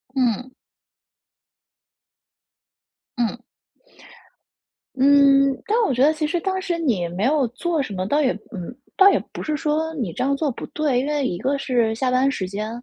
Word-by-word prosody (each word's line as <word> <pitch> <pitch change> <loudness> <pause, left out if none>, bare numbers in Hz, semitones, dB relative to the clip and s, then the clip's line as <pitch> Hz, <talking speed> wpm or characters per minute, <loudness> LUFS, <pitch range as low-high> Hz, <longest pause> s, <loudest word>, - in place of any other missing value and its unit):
嗯。 250 -1 0 2.7
嗯。 240 0 -1 1.6
嗯， 275 0 +5
但 435 - +1
我 - - 0
觉 250 +2 +2
得 310 - +4
其 310 -1 -2
实 345 +3 -1
当 380 0 -2
时 360 -3 -2
你 235 - 0
没 175 +4 -4
有 275 +1 +2
做 315 +6 -2
什 225 - -5
么， 185 -1 -3
倒 290 +7 +2
也 260 -3 +2 0.2
嗯， 195 +2 -7 0.2
倒 390 0 +8
也 - - +2
不 - - -7
是 305 - -2
说 310 +2 -1
你 235 - -3
这 - - -6
样 275 +1 +1
做 290 0 -1
不 - - -7
对。 290 -5 0
因 265 - -2
为 295 -2 0
一 175 -8 -2
个 270 +8 -1
是 235 -5 0
下 255 +2 -1
班 255 +2 +3
时 210 -8 -3
间， 210 +3 -4
275 Hz, 185 characters per minute, -22 LUFS, 235-300 Hz, 2.7 s, 倒